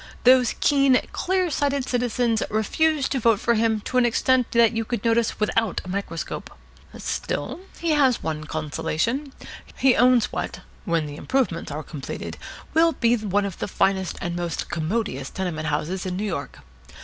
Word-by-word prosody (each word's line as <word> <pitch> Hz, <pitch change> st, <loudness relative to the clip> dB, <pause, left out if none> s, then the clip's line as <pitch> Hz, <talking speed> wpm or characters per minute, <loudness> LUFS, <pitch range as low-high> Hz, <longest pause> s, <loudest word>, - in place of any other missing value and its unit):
Those 250 Hz, -1 st, +5 dB
keen, 275 Hz, -3 st, +4 dB
clear 370 Hz, -2 st, 0 dB
sighted 280 Hz, -2 st, 0 dB
citizens 245 Hz, -2 st, +1 dB
refused 285 Hz, +7 st, +1 dB
to 270 Hz, -, +1 dB
vote 225 Hz, -3 st, +3 dB
for 235 Hz, -, +2 dB
him 220 Hz, -1 st, +1 dB
to 255 Hz, +4 st, 0 dB
an 245 Hz, -, +4 dB
extent 255 Hz, +1 st, +2 dB
that 235 Hz, -1 st, +5 dB
you 225 Hz, -1 st, -1 dB
could 235 Hz, -1 st, -4 dB
notice 230 Hz, 0 st, +2 dB
without 215 Hz, -1 st, +1 dB
a -, -, -8 dB
microscope. 185 Hz, -3 st, -4 dB, 0.5 s
Still, -, -, -3 dB, 0.2 s
he 335 Hz, -1 st, 0 dB
has 275 Hz, -5 st, +3 dB
one 155 Hz, -1 st, -3 dB
consolation. 160 Hz, -, -2 dB, 0.5 s
He 265 Hz, -2 st, +4 dB
owns 250 Hz, -2 st, +4 dB
what, -, -, -4 dB, 0.2 s
when 165 Hz, -2 st, +1 dB
the 145 Hz, 0 st, -7 dB
improvements 235 Hz, -10 st, -1 dB
are 155 Hz, +2 st, -4 dB
completed, 145 Hz, -4 st, -6 dB, 0.4 s
will 330 Hz, +1 st, +4 dB
be 235 Hz, -4 st, +2 dB
the 200 Hz, -3 st, -1 dB
finest 190 Hz, -1 st, 0 dB
and 175 Hz, -2 st, -3 dB
most 175 Hz, -1 st, -3 dB
commodious 160 Hz, -, -2 dB
tenement 165 Hz, -5 st, -3 dB
houses 170 Hz, +5 st, -2 dB
in 180 Hz, 0 st, -3 dB
New 205 Hz, -, -2 dB
York. 165 Hz, -8 st, -5 dB
225 Hz, 160 wpm, -24 LUFS, 175-255 Hz, 0.5 s, Those